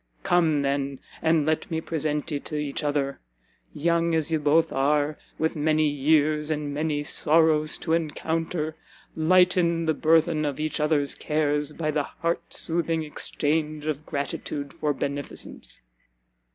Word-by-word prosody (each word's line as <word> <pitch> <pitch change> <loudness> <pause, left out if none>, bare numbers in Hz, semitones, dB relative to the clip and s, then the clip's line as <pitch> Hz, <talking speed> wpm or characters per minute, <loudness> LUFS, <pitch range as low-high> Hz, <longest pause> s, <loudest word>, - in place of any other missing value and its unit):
Come, 160 -5 +3
then, 140 -1 -1 0.2
and 160 -2 +3
let 155 0 0
me 160 -2 -1
present 155 -1 -2
ye 145 - -1
to 150 - -7
each 150 0 -3
other! 145 -2 -1 0.5
young 170 +1 +1
as 160 0 0
ye 160 - +2
both 150 +2 +3
are, 145 +2 +1 0.2
with 160 +1 0
many 155 0 +2
years 150 +1 +2
and 150 -2 -2
many 150 0 -1
sorrows 155 0 +3
to 160 - -2
encounter, 160 0 -1 0.4
lighten 170 0 +3
the 160 - +2
burthen 160 0 +3
of 145 -1 -2
each 155 0 -1
other's 150 -2 +1
cares, 150 -1 0
by 155 -1 -2
the 150 0 +1
heart 170 +4 -3
soothing 165 -1 0
exchange 150 0 -2
of 155 -1 -2
gratitude 140 0 -4
for 150 - -1
beneficence!" 140 0 -6
155 Hz, 140 wpm, -25 LUFS, 145-160 Hz, 0.5 s, Come